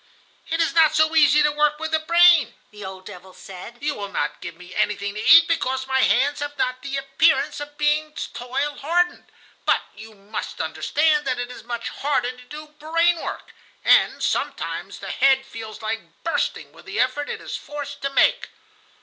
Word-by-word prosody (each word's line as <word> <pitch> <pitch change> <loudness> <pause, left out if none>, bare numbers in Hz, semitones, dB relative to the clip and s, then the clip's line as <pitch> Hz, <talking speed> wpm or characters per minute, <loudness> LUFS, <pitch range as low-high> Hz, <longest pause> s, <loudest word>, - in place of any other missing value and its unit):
"It 330 0 -1
is 330 0 +1
not 320 -2 +4
so 315 +1 +3
easy 300 -1 +5
to 300 - +3
work 300 0 +1
with 320 +1 -5
the 315 - +2
brain," 335 -6 +5 0.2
the 210 -1 -11
old 190 0 -9
devil 185 +1 -11
said. 195 +5 -11
"You 295 0 0
will 200 -6 -7
not - - -3
give 170 - -7
me 180 +1 -13
anything 200 +1 -1
to 210 - -5
eat 330 +2 +8
because 265 -6 -1
my 265 0 0
hands 280 +4 +2
have 290 0 -5
not 255 0 -1
the 275 +1 -4
appearance 275 +2 +1
of 290 0 -9
being 300 +1 +1 0.2
toil 270 +4 -3
hardened, 350 +4 -1 0.3
but - - +2
you 215 +1 -12
must 200 +1 -7
understand 300 -1 +1
that 255 -2 0
it 245 0 -4
is - - -11
much 235 0 -5
harder 270 -3 -1
to 250 0 -15
do 300 +4 -9
brain 330 +3 +2
work, - - -7 0.3
and - - +4
sometimes - - -3
the - - -7
head 265 -1 +3
feels 225 -4 -9
like 220 +1 -6
bursting - - -2
with - - -17
the 410 - -5
effort 260 +4 0
it - - -4
is - - -6
forced 285 -1 -7
to 275 - -1
make." - - +2
280 Hz, 190 wpm, -22 LUFS, 240-310 Hz, 0.3 s, eat